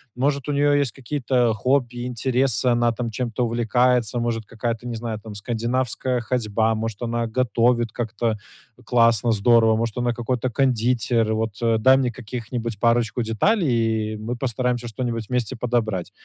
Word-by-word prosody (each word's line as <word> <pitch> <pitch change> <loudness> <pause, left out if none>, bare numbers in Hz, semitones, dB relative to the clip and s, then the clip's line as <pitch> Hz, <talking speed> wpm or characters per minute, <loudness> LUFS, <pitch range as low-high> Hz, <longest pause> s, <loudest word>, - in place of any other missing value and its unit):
может 140 +2 0
у - - 0
нее 145 0 +3
есть 135 -6 0
какие-то 125 -3 0
хобби, 125 +1 0
интересы, 125 0 +1
она 120 0 +2
там 115 0 -4
чем-то 120 +1 -2
увлекается, 120 0 +1
может 115 -2 -2
какая-то, 115 +1 -4
не 120 - -4
знаю, 110 -1 -4
там 105 -1 -10
скандинавская 120 +3 -1
ходьба, 110 -2 0
может 110 0 -4
она 120 0 -1
готовит 120 -2 +2
как-то 115 -1 -2 0.5
классно, 115 -1 +3
здорово, 110 +1 +4
может 115 0 -2
она 120 -1 0
какой-то 125 +2 -2
кондитер. 120 -2 +1
Вот 110 0 -1 0.3
дай 130 +4 +6
мне 125 -3 0
каких-нибудь 115 -2 -5
парочку 120 0 +2
деталей, 115 - +1
и - - -6
мы 115 +3 -4
постараемся 125 -1 -1
что-нибудь 115 -2 -4
вместе 125 0 -1
подобрать. 110 -6 -1
120 Hz, 150 wpm, -23 LUFS, 110-125 Hz, 0.5 s, дай